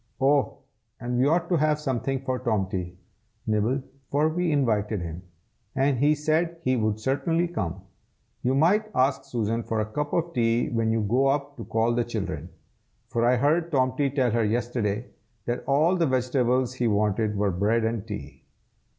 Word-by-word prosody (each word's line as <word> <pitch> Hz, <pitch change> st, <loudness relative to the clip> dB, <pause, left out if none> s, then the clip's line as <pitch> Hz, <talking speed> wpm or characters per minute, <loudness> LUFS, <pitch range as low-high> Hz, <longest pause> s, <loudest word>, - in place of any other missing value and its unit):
Oh! 140 Hz, +1 st, +2 dB, 0.4 s
and 120 Hz, 0 st, -2 dB
we 130 Hz, -, +4 dB
ought 170 Hz, +3 st, +2 dB
to 175 Hz, -, +3 dB
have 150 Hz, 0 st, +2 dB
something 135 Hz, -2 st, -2 dB
for 130 Hz, -1 st, -2 dB
Tomty, 95 Hz, -6 st, -2 dB, 0.5 s
Nibble, 110 Hz, +5 st, 0 dB, 0.3 s
for 150 Hz, +3 st, +2 dB
we 175 Hz, +1 st, 0 dB
invited 110 Hz, -7 st, +1 dB
him, 85 Hz, 0 st, -6 dB, 0.5 s
and 135 Hz, -1 st, +2 dB
he 150 Hz, +3 st, +4 dB
said 160 Hz, +3 st, 0 dB
he 130 Hz, 0 st, +2 dB
would 110 Hz, -2 st, 0 dB
certainly 145 Hz, +8 st, 0 dB
come. 95 Hz, -, -4 dB, 0.6 s
You 130 Hz, +2 st, +1 dB
might 200 Hz, +9 st, +3 dB
ask 135 Hz, +1 st, +2 dB
Susan 115 Hz, -3 st, -1 dB
for 110 Hz, -1 st, -2 dB
a 110 Hz, -, 0 dB
cup 145 Hz, +7 st, -3 dB
of 170 Hz, 0 st, -1 dB
tea 115 Hz, -1 st, +1 dB
when 115 Hz, -1 st, 0 dB
you 115 Hz, 0 st, +1 dB
go 125 Hz, +6 st, +2 dB
up 140 Hz, +1 st, -1 dB
to -, -, -7 dB
call 115 Hz, +1 st, +1 dB
the 120 Hz, 0 st, +1 dB
children, 115 Hz, -4 st, -4 dB, 0.6 s
for 115 Hz, -, 0 dB
I 120 Hz, +1 st, +4 dB
heard 160 Hz, +7 st, +1 dB
Tomty 130 Hz, 0 st, +1 dB
tell 130 Hz, -3 st, +1 dB
her 115 Hz, +1 st, +1 dB
yesterday 115 Hz, 0 st, -1 dB, 0.4 s
that 120 Hz, +1 st, -2 dB
all 155 Hz, +6 st, +3 dB
the 170 Hz, -3 st, +2 dB
vegetables 125 Hz, -1 st, +1 dB
he 125 Hz, -2 st, 0 dB
wanted 105 Hz, 0 st, +1 dB
were 100 Hz, -1 st, +1 dB
bread 105 Hz, +6 st, +1 dB
and 115 Hz, -1 st, -2 dB
tea." 100 Hz, -11 st, -7 dB
125 Hz, 175 wpm, -26 LUFS, 110-145 Hz, 0.6 s, we